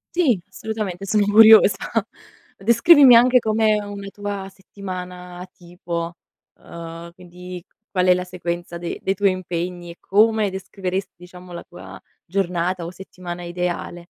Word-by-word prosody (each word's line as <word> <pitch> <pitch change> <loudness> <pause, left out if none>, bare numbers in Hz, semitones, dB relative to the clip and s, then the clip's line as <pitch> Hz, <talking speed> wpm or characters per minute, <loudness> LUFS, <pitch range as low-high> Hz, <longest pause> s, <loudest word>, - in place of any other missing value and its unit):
Sì, 280 - +3
assolutamente, 210 -4 -5
sono 210 +1 +2
curiosa 215 -1 +7 0.8
Descrivimi 250 - +6
anche 250 +1 +6
com'è 215 -1 +1
una 200 -1 -8
tua 200 -1 -6
settimana 180 -2 -9
tipo, 170 -1 -6 0.4
uhm, 170 0 -10
quindi, 180 0 -10 0.3
qual 185 -1 0
è 180 - +7
la 180 0 -3
sequenza 175 -1 -5
de 170 0 -6
dei 195 - -1
tuoi 200 0 +2
impegni 175 -1 -5
e 170 - -14
come 215 +1 +2
descriveresti, 190 0 -5
diciamo, 180 0 -13
la 170 - -7
tua 95 +1 -12 0.3
giornata 180 -1 -2
o 170 - -6
settimana 180 -1 -9
ideale. 175 0 -4
185 Hz, 130 wpm, -21 LUFS, 175-205 Hz, 0.8 s, curiosa